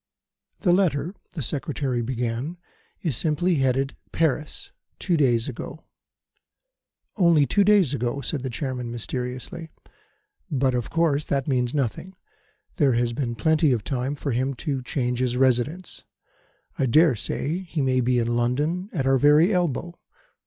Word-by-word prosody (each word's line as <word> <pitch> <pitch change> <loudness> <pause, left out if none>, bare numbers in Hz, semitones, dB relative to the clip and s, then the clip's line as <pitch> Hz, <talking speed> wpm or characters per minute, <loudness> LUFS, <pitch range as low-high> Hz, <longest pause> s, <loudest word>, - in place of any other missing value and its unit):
"The 175 -4 +3
letter," 175 -3 +1 0.2
the 155 -6 -4
Secretary 135 -2 -2
began, 125 +6 -3 0.5
"is 155 -8 0
simply 165 +5 +1
headed 135 0 +1 0.2
'Paris,' 155 -1 -1 0.3
dated - - -47
two 180 - +1
days 120 -6 +2
ago." 140 +4 -7 1.3
"Only 170 -6 +5
two 200 +11 +3
days 195 -8 +4
ago," 125 0 -1
said 140 +2 -3
the 130 - -3
Chairman, 125 -1 -4
mysteriously. 125 - -5 0.8
"But, 135 -4 +1
of 120 -3 -2
course, 160 -3 +1
that 135 0 -1
means 125 -1 0
nothing. 145 - -2 0.6
There 140 -7 +4
has 120 0 +1
been 120 -2 -2
plenty 160 +2 +3
of 115 -4 -2
time 135 +3 -2
for 140 -1 -3
him 130 +3 -1
to 140 -4 -1
change 125 -1 -2
his 125 -1 0
residence. 135 +7 0 0.8
I 135 - +2
dare 155 +2 +5
say 150 - -3
he 170 -6 -3
may 130 -1 +2
be 125 +1 +2
in 120 0 0
London 145 - 0
at 140 -7 -2
our 135 0 +3
very 150 - +5
elbow. 175 -1 -1
135 Hz, 150 wpm, -24 LUFS, 125-160 Hz, 1.3 s, Only